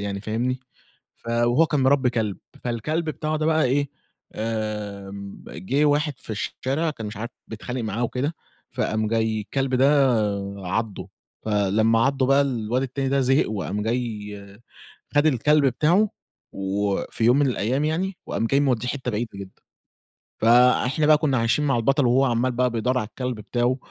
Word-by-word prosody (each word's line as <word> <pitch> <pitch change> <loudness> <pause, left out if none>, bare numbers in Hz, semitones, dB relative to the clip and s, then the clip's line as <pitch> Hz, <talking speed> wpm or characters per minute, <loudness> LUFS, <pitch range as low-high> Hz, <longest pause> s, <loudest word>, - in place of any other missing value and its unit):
يعني 100 -1 -3
فاهمني، 120 +4 -2 0.6
ف - - -13
وهو 120 +6 +3
كان 150 -2 0
مربّي 130 -1 +3
كلب، 110 -5 -1 0.3
فالكلب 125 +8 -1
بتاعه 155 0 -2
ده 155 0 -1
بقى 160 -1 +3
إيه، 140 +2 +1 0.4
آمم 105 -3 -5
جِه 130 - -1
واحد 150 0 +2
في - - -11
الشارع 135 +8 -2
كان 115 -8 -7
مش 105 - -7
عارف 115 +4 -5 0.2
بيتخانق 120 +3 -5
معاه 110 +2 -2
وكده، 135 +7 -2 0.4
فقام 110 0 -1
جاي 110 -1 0
الكلب 130 +5 -2
ده 135 0 +4 0.4
عَضّه، 100 +3 -3 0.3
فلمّا 110 +2 +2
عَضّه 135 -1 +1
بقى 135 +1 +4
الواد 125 -2 -1
التاني 135 +1 -2
ده 135 0 +2
زهق 135 -1 +2
وقام 105 -1 -3
جاي 105 -4 -4 0.6
خَد 145 +1 +4
الكلب 150 +1 +3
بتاعه 165 - +3 0.4
وفي 100 +3 -2
يوم 125 +4 +5
من 145 - +3
الأيام 125 +4 0
يعني 180 +4 -1
وقام 115 - -1
جاي 140 +3 +2
مودّيه 125 -4 +1
حتّة 125 -2 -3
بعيدة 115 +2 -2
جدًا. 95 -1 -11 0.8
فإحنا 125 +5 +4
بقى 155 0 +6
كُنّا 145 -4 +1
عايشين 115 +6 +1
مع 135 -3 +2
البطل 135 +4 +2
وهو 130 +3 +4
عَمّال 125 0 +1
بقى 125 +1 +1
بيدوّر 125 +2 0
على 110 - -1
الكلب 125 +1 -4
بتاعه 120 +4 0
125 Hz, 160 wpm, -24 LUFS, 110-140 Hz, 0.8 s, بقى